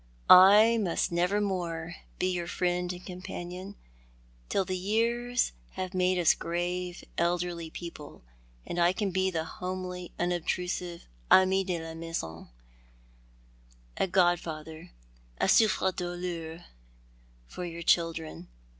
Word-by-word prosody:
I 210 +5 +8
must 180 -5 0
never 180 +4 +1
more 175 -4 -3 0.2
bo - - +1
your 180 -2 -1
friend 180 0 -1
and 180 0 -9
companion, 180 +1 -7 0.7
till 195 - +1
the 185 - -2
years 235 +6 0 0.2
have 185 0 -4
made 185 0 +2
us 175 -3 +5
grave, 175 +1 -3 0.2
elderly 170 -1 -1
people, 160 - -9 0.4
and 175 - -4
I 175 +1 +4
can 200 0 -1
be 190 +1 +1
the 165 -3 -2
homely, 180 0 -5
unobtrusive 175 0 -2 0.2
ami 190 +1 +5
de 180 -3 -2
la 165 0 -7
maisou 165 - -6 0.7
— - - -30
a - - +1
godfather, 165 -4 0 0.5
a - - +2
souffrc 210 -4 +3
douleur 175 -2 -5 0.8
for 180 - -7
your 170 -1 -6
children. 165 - 0
175 Hz, 120 wpm, -29 LUFS, 165-185 Hz, 0.8 s, I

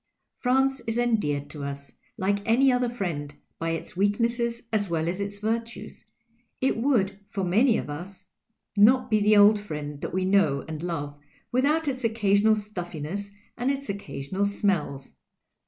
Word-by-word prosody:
France 265 +1 +2
is 225 +1 -1
endeared 205 -13 +1
to 150 -2 -6
us, 140 0 -6 0.2
like 200 +2 +1
any 250 +5 +4
other 250 -1 +1
friend, 160 -11 -4 0.2
by 165 - -1
its 165 +2 -4
weaknesses 235 +4 0
as 205 -3 +1
well 165 -1 0
as 180 +3 -2
its 200 0 -4
virtues; 225 +3 -4 0.5
it 265 - +1
would, 225 -6 +1
for 200 -1 -3
many 220 +7 +3
of - - -4
us, 175 +7 -8 0.5
not 250 +4 +5
be 215 - +4
the 210 +1 +4
old 205 +1 +7
friend 150 -7 -6
that - - -4
we 185 0 0
know 185 -8 +2
and 160 -1 -5
love 145 -4 -4 0.3
without 295 +5 +2
its 260 -2 -2
occasional 215 -1 +3
stuUincss 195 -2 -5 0.3
and 245 +2 -1
its 275 -2 -2
occasional 195 -1 -2
smells. 170 -10 -1
205 Hz, 155 wpm, -26 LUFS, 170-235 Hz, 0.5 s, old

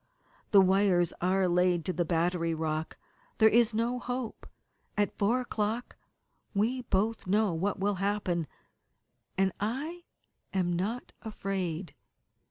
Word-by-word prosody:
The 200 - +7
wires 190 -2 +3
are 185 +1 +2
laid 180 -1 +2
to 185 - -1
the 175 -1 0
battery 170 0 +1
rock. 155 0 -3 0.4
There 220 - +7
is 235 +1 +4
no 235 +3 0
hope. 245 -2 -5 0.5
At 205 -1 +1
four 230 +5 +2
o'clock 225 0 -2 0.6
we 235 +6 +1
both 220 -2 -1
know 205 0 +2
what 190 +5 -1
will 205 +1 +1
happen. 195 -5 0 0.9
And 190 0 +3
I 295 - -3 0.5
am 180 -2 +1
not 210 +8 -3
afraid." 190 -5 -3
195 Hz, 125 wpm, -30 LUFS, 175-220 Hz, 0.9 s, The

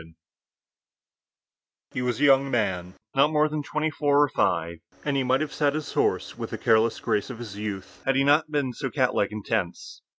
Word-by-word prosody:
WAR 80 - -17 1.8
HE - - -3
was 125 -1 -1
a - - 0
young 135 -1 +5
man, 95 -7 -1 0.2
not 140 +2 +4
more 150 0 +3
than 155 0 -3
twenty 155 +2 -2
four 145 -1 +3
or 145 - +1
five, 85 -5 0 0.3
and 145 -2 0
he 135 - +2
might 130 +2 +2
have 155 - -3
sat 145 -1 +1
his 155 -2 -4
horse - - 0
with - - -5
the - - -5
careless 110 +1 +2
grace 105 - -1
of 130 - -7
his 110 -4 -8
youth 105 -2 -6
had 135 - +1
he 135 - +3
not 145 +3 +3
been 145 -4 -1
so 135 +2 -4
catlike 130 -7 +1
and 105 -1 -7
tense. 95 -6 -3
130 Hz, 205 wpm, -25 LUFS, 105-145 Hz, 1.8 s, young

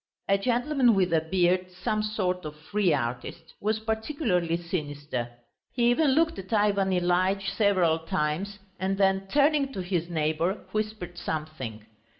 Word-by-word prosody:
A 195 - +4
gentleman 245 +3 +2
with 185 -3 +2
a 160 - +4
beard, 180 +2 +1
some 185 +4 -2
sort 185 -4 -1
of 150 -1 -6
free 180 +4 0
artist, 135 +5 -3
was 215 +1 +1
particularly 220 - -1
sinister; 145 -7 -4 0.4
he 240 -1 +3
even 280 +2 +3
looked 325 -3 +2
at 190 +2 -9
Ivan 205 -3 +2
Ilyitch 185 +2 +1
several 185 -6 +3
times, 165 +5 -2 0.2
and 190 +1 -1
then 195 0 +2
turning 285 +3 +3
to 190 - -3
his 175 -2 -2
neighbour, 160 +4 -1
whispered 215 -5 -3
something. 150 -11 -5
185 Hz, 145 wpm, -27 LUFS, 165-215 Hz, 0.4 s, A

